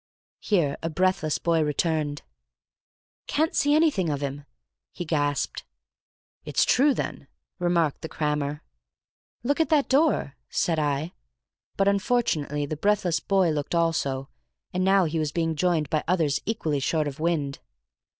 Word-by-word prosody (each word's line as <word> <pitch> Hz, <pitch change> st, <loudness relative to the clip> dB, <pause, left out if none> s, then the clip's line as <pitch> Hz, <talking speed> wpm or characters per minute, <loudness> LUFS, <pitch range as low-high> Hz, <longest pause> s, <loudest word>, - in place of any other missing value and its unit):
Here 165 Hz, -9 st, +1 dB
a 165 Hz, -, -2 dB
breathless 175 Hz, -2 st, +1 dB
boy 165 Hz, -1 st, +1 dB
returned. 150 Hz, -1 st, -1 dB, 1.0 s
"Can't 315 Hz, +2 st, +1 dB
see 290 Hz, +1 st, +3 dB
anything 295 Hz, -, +2 dB
of 145 Hz, -1 st, -2 dB
him," 140 Hz, 0 st, -4 dB, 0.5 s
he 175 Hz, -, -6 dB
gasped. 145 Hz, -3 st, -1 dB, 0.8 s
"It's -, -, +1 dB
true, 275 Hz, +1 st, +4 dB
then," -, -, -4 dB, 0.3 s
remarked 170 Hz, -4 st, +1 dB
the 160 Hz, -, -6 dB
crammer. 150 Hz, -1 st, -2 dB, 0.8 s
"Look 285 Hz, +5 st, 0 dB
at 320 Hz, -4 st, +2 dB
that 300 Hz, -3 st, +3 dB
door," 275 Hz, -, +2 dB
said 165 Hz, -2 st, 0 dB
I. 150 Hz, +2 st, -1 dB, 0.6 s
But 195 Hz, -, +2 dB
unfortunately 200 Hz, -, +1 dB
the 150 Hz, +1 st, -4 dB
breathless 190 Hz, -2 st, +1 dB
boy 190 Hz, -4 st, +2 dB
looked 150 Hz, +2 st, -2 dB
also, 140 Hz, -5 st, 0 dB, 0.5 s
and 185 Hz, 0 st, 0 dB
now 190 Hz, 0 st, +4 dB
he 160 Hz, 0 st, -1 dB
was 155 Hz, -2 st, -1 dB
being 165 Hz, -1 st, -1 dB
joined 165 Hz, -2 st, +1 dB
by 155 Hz, -, +1 dB
others 160 Hz, -5 st, +1 dB
equally 160 Hz, -10 st, -1 dB
short 155 Hz, +2 st, 0 dB
of 145 Hz, +1 st, -6 dB
wind. 155 Hz, -4 st, -1 dB
165 Hz, 140 wpm, -26 LUFS, 150-190 Hz, 1.0 s, true